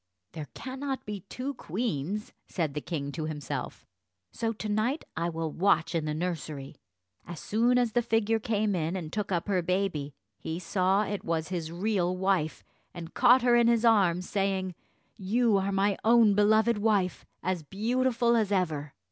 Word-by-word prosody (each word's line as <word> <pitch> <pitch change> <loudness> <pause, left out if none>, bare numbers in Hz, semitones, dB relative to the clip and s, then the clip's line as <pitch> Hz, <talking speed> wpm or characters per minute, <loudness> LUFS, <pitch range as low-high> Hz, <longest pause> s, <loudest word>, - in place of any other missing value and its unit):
"There 155 -2 -7
cannot 265 +1 -5
be 210 -1 -5
two 265 +3 -4
queens," 205 - -3
said 160 -6 -2
the 150 - -3
king 145 -4 -4
to 155 +1 -4
himself, 150 -3 -5 0.5
"so 225 -1 -2
to 215 -1 -6
night 215 +8 0
I 170 +1 -1
will 165 -1 -3
watch 170 -2 +2
in 165 -2 0
the 150 0 -2
nursery." 155 -5 -4 0.5
As 175 -3 -7
soon 235 +4 +2
as 245 -2 +2
the 240 - +2
figure 225 -1 +1
came 215 -1 0
in 165 +1 -1
and 165 -4 -5
took 210 -2 -2
up 175 0 -1
her 190 -3 +1
baby, 175 -6 -1 0.2
he 160 - -4
saw 185 +3 +1
it 205 -1 -4
was 165 0 -2
his 170 -3 -3
real 185 -1 0
wife, 185 -5 0 0.3
and 170 -1 -8
caught 250 +1 +5
her 245 -1 +5
in 235 -1 +5
his 235 0 +3
arms, 185 -6 +3
saying, 195 -2 -1 0.4
"You 215 +2 +2
are 195 +1 0
my 195 0 +1
own 225 -2 +6
beloved 215 +2 +3
wife, 205 -4 +1 0.2
as 185 -1 -1
beautiful 235 - +1
as 215 -3 +1
ever." 155 -7 -1
195 Hz, 175 wpm, -28 LUFS, 165-225 Hz, 0.5 s, own